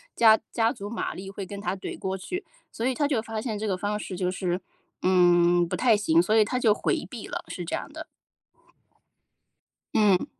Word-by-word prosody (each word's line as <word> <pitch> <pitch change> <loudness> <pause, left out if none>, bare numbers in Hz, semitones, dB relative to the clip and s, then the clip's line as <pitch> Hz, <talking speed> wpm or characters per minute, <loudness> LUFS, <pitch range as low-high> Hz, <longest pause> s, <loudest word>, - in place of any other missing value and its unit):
加 220 -2 +6
加 225 -1 +2
足 200 +1 -7
马 230 - -3
力 190 +1 -8
会 195 0 -6
跟 200 +1 -7
他 180 0 -2
怼 190 - -6
过 190 0 -2
去， 360 - -5 0.3
所 225 - -5
以 260 0 +1
他 290 +1 +1
就 270 -6 0
发 225 0 -5
现 220 -3 -3
这 215 - -2
个 190 - 0
方 205 +2 -2
式 190 - -6
就 180 -1 0
是， 180 -1 -2 0.4
嗯， 175 -1 +4
不 - - -2
太 240 -3 +4
行， 170 -6 +3
所 190 +6 +3
以 220 - +6
他 250 +5 -2
就 230 -4 +4
回 - - -1
避 - - -7
了， - - -5
是 - - -6
这 - - -2
样 - - -7
的。 - - -7 1.9
嗯。 205 -4 +4
205 Hz, 225 characters per minute, -26 LUFS, 185-220 Hz, 1.9 s, 加